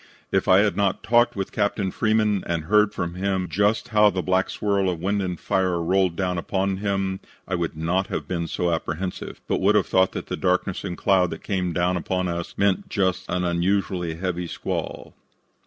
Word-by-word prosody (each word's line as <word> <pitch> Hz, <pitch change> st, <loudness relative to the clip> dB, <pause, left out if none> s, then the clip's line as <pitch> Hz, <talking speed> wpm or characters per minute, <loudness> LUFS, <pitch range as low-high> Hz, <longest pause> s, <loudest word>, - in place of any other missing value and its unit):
If 95 Hz, +1 st, +1 dB
I 95 Hz, 0 st, +6 dB
had 105 Hz, -3 st, +1 dB
not 100 Hz, -1 st, 0 dB
talked 120 Hz, +2 st, +3 dB
with 95 Hz, -1 st, -3 dB
Captain 100 Hz, -2 st, 0 dB
Freeman 110 Hz, -2 st, +1 dB
and 85 Hz, -2 st, -1 dB
heard 105 Hz, +4 st, +3 dB
from 85 Hz, -1 st, -3 dB
him 95 Hz, 0 st, -1 dB
just 100 Hz, +8 st, +1 dB
how 105 Hz, -2 st, +5 dB
the 95 Hz, -2 st, -2 dB
black 95 Hz, 0 st, +1 dB
swirl 100 Hz, -2 st, 0 dB
of 90 Hz, -3 st, -3 dB
wind 100 Hz, +4 st, 0 dB
and 90 Hz, -3 st, -3 dB
fire 95 Hz, -2 st, 0 dB
rolled 90 Hz, +1 st, +1 dB
down 90 Hz, -1 st, -1 dB
upon 95 Hz, +2 st, -1 dB
him, 95 Hz, -1 st, -1 dB, 0.3 s
I 95 Hz, -, -4 dB
would 85 Hz, -3 st, -2 dB
not 90 Hz, +4 st, 0 dB
have -, -, -4 dB
been 85 Hz, -2 st, -2 dB
so 90 Hz, +1 st, -1 dB
apprehensive, 85 Hz, +3 st, -4 dB
but -, -, 0 dB
would 100 Hz, +3 st, +4 dB
have 105 Hz, -, +4 dB
thought 95 Hz, 0 st, +2 dB
that -, -, -5 dB
the -, -, -3 dB
darkness 90 Hz, 0 st, 0 dB
and 90 Hz, -3 st, -4 dB
cloud 95 Hz, -3 st, +3 dB
that 80 Hz, -, -7 dB
came 90 Hz, -3 st, -1 dB
down 90 Hz, +1 st, +1 dB
upon 90 Hz, +1 st, -1 dB
us 85 Hz, 0 st, -4 dB
meant 100 Hz, -2 st, +1 dB
just 95 Hz, -2 st, -1 dB
an 90 Hz, 0 st, 0 dB
unusually 90 Hz, -1 st, 0 dB
heavy 90 Hz, 0 st, -3 dB
squall." -, -, -5 dB
95 Hz, 200 wpm, -24 LUFS, 90-100 Hz, 0.3 s, I